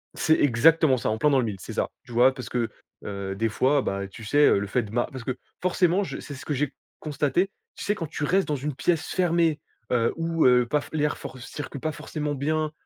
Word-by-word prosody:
C'est 160 - +3
exactement 145 +2 +5
ça, 115 - -1
en 110 - 0
plein 150 - +3
dans 135 - +4
le 125 - +1
mille, 100 -4 -4
c'est - - -8
ça. - - -1 0.2
Tu - - -13
vois, 125 +3 +5
parce 130 -2 -7
que, 120 -2 -1 0.3
heu, 100 -1 -4
des 110 +3 0
fois, 135 +6 +2
bah, 100 -2 -2
tu 100 +4 -12
sais, 145 +7 +4
heu, - - +4
le 100 - -3
fait 120 +4 0
de 105 - -9
ma 120 +2 0
parce 130 -3 -7
que 130 +1 -2 0.3
forcément, 185 +1 +2
je - - -5
c'est 145 - -8
ce 130 - -10
que 150 - -1
j'ai 140 0 -1 0.3
constaté, 150 +4 0 0.3
tu - - -7
sais 205 - +1
quand 170 - -4
tu 145 - -5
restes 185 +6 +2
dans 150 - 0
une 145 +1 -4
pièce 160 +4 0
fermée, 170 -4 +2 0.3
heu, 115 -2 +2
ou, 165 0 0
heu, 125 -1 +5
paf 150 0 0
l'air 150 -1 0
for 130 - -8
circule 140 +1 -7
pas 155 - -1
forcément 150 -1 -4
bien, 155 +2 0
140 Hz, 245 wpm, -26 LUFS, 120-155 Hz, 0.3 s, exactement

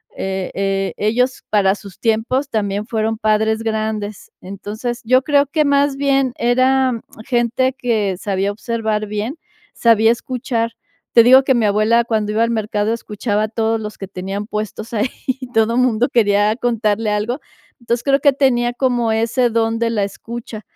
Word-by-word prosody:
e 190 -1 -3
e 195 0 -1
ellos 250 +4 0
para 200 -2 +3
sus 200 -2 -11
tiempos 235 +5 0
también 205 -3 -2
fueron 220 -1 -1
padres 220 +1 +1
grandes, 215 -2 -3
entonces, 210 +5 -5
yo 255 +3 +3
creo 285 0 +3
que 305 +2 +1
más 280 0 +2
bien 275 -2 +1
eran 255 0 +2 0.2
gente 255 +1 +1
que 225 -7 -1
sabía 195 +1 -1
observar 220 0 -2
bien, 210 +8 -4 0.4
sabía 225 -1 +4
escuchar, 235 -1 -2 0.4
te 230 - +8
digo 260 +3 +7
que 265 -1 +2
mi 235 -2 +2
abuela 215 +3 +3
cuando 220 -3 -1
iba 220 +2 +2
al 230 - 0
mercado 215 -1 -1
escuchaba 210 -2 -2
a - - 0
todos 225 0 -1
los 210 0 -7
que 195 - -7
tenían 195 +2 -5
puestos 215 +1 -5
ahí 225 +3 0 0.5
todo 225 +1 +2
mundo 245 -1 +2
quería 210 -2 +3
contarle 225 -3 0
algo, 210 +6 -1 0.4
entonces, 235 0 -2
creo 275 -1 +3
que 285 0 +4
tenía 245 -3 +2
como 245 -3 0
ese 230 +3 +1
don 225 0 0
de 230 0 +1
la 215 -3 0
escucha. 225 +2 -7
225 Hz, 160 wpm, -18 LUFS, 210-245 Hz, 0.5 s, te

